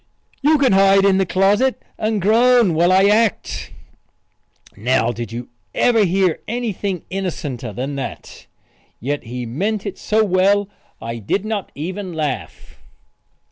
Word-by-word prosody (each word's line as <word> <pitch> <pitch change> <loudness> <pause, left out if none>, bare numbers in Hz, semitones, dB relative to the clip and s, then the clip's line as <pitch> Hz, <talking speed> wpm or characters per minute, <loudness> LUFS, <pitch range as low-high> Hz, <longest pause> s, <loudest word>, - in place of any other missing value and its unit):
"You 305 +2 +4
can 275 -2 +3
hide 195 0 +5
in 195 -1 +4
the 190 - +1
closet 205 +8 +2 0.2
and 215 -1 -1
groan 230 0 +4
while 170 +3 +3
I 190 +1 +5
act." 215 0 +1 1.0
Now 120 +1 +1
did 120 -1 -6
you 120 +1 -6 0.3
ever 225 -4 +3
hear 185 -1 +1
anything 210 -6 -3
innocenter 150 - -4
than 130 +7 -4
that? 135 - -7 0.5
Yet 140 +4 -3
he 125 +1 -5
meant 195 - -2
it 200 -2 -5
so 220 +1 +1
well 195 +1 +2 0.3
I 115 0 -5
did 185 - -2
not 215 -3 -3
even 185 +5 -5
laugh. 145 - -5
190 Hz, 140 wpm, -19 LUFS, 145-210 Hz, 1.0 s, hide